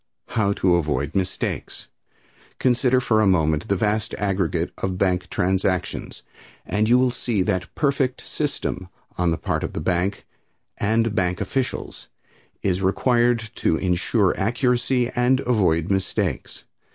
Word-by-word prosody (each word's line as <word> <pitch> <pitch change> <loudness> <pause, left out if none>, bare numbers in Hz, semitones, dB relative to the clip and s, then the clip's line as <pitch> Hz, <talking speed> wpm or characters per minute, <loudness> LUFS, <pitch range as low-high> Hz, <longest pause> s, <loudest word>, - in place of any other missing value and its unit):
How 110 -4 +1
to 90 -3 +3
Avoid 75 -2 -1
Mistakes. 95 -2 -3 0.7
Consider 125 0 +3
for 110 -4 +2
a 105 - +3
moment 80 -5 +2
the 100 - +1
vast 105 +2 0
aggregate 95 -4 -1
of 95 -1 -2
bank 90 -1 0
transactions, 95 -3 -1 0.4
and 105 +1 0
you 120 - +6
will 125 0 +3
see 115 -5 -1
that 90 0 -2
perfect 140 -3 0
system 90 -1 -3 0.3
on 90 -1 +2
the 80 - 0
part - - -2
of - - -4
the - - -3
banks 90 +3 -1 0.6
and 110 +1 +1
bank 90 -4 0
officials 130 -1 -3 0.6
is 95 -1 0
required 120 +3 +2
to - - +2
insure 95 +3 +1
accuracy 125 +3 +1
and 125 +2 +3
avoid 95 - +1
mistakes. 95 -1 -2
100 Hz, 135 wpm, -23 LUFS, 90-120 Hz, 0.7 s, you